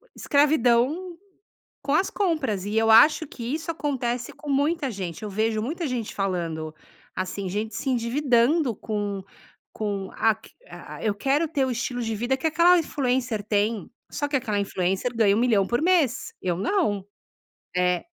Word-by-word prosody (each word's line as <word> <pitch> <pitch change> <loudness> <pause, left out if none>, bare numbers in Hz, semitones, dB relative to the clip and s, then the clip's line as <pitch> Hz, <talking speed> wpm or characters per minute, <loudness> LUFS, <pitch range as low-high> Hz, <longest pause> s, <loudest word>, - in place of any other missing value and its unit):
escravidão 290 +4 +2 0.7
com 280 - 0
as 345 +5 +2
compras 295 - -1
e 210 +2 -2
eu 225 0 +3
acho 300 +8 +6
que 255 - -10
isso 325 +1 -4
acontece 250 -6 -2
com 295 - -8
muita 285 +1 +1
gente. 185 -4 -6
Eu 210 - -4
vejo 215 +2 0
muita 320 +7 -3
gente 245 -4 -3
falando, 165 -5 -2 0.4
assim, 185 +1 -3
gente 210 +3 -3
se 270 - -3
endividando 250 +2 +2
com 205 -3 -3 0.5
com 200 -3 -3
a 225 -1 +3
q 220 - -18 0.2
a - - -10
a - - -10
"eu 210 -2 +1
quero 280 +9 +1
ter 290 -4 0
o - - -2
estilo 245 0 -2
de 225 -1 -2
vida 240 +5 0
que 265 - -2
aquela 340 +3 +5
influencer 255 -7 -1
tem.". 210 -1 0 0.2
Só 290 - -2
que 285 - 0
aquela 215 -5 -1
influencer 195 +4 -1
ganha 205 -3 +4
1.000.000 225 -5 +3
por 240 +3 0
mês. 330 -8 +1
Eu, 175 -2 0
não. 205 - 0 0.7
Eh 180 -1 +1
235 Hz, 165 wpm, -25 LUFS, 205-285 Hz, 0.7 s, acho